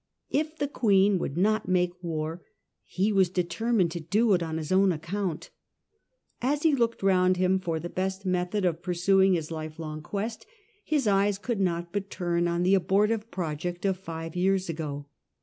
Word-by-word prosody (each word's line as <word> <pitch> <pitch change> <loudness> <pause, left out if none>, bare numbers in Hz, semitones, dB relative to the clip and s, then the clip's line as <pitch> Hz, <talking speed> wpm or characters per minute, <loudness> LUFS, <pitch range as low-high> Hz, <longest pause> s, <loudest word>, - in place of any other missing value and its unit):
If 310 +2 -1
the 285 - -1
Queen 200 -7 +3
would 145 -2 -4
not 215 +3 +2
make 180 -1 0
war 160 0 -3 0.4
he 195 +3 0
was 190 -3 +4
determined 180 +2 0
to 170 - -4
do 205 +7 +2
it 180 - +2
on 160 -1 -3
his 155 0 -5
own 190 0 +4
account 175 +1 -4 0.9
As 285 +4 0
he 320 -2 +4
looked 235 -5 0
round 185 -1 +3
him 185 +1 +2
for 165 -3 -2
the 175 - -5
best 190 +2 -3
method 185 +2 0
of 170 -1 0
pursuing 190 +2 +3
his 160 -1 -4
life 155 -1 -6
long 155 -1 -6
quest, 210 +7 -4 0.4
his 295 -4 0
eyes 200 -1 +2
could 220 +1 -3
not 170 -2 -1
but 200 -1 -3
turn 175 -1 0
on 170 +1 0
the 185 +2 +3
abortive 210 +4 +2
project 175 0 -4
of 190 -1 +2
five 165 -3 -7
years 190 0 +1
ago. 150 -3 -4
185 Hz, 180 wpm, -27 LUFS, 170-200 Hz, 0.9 s, was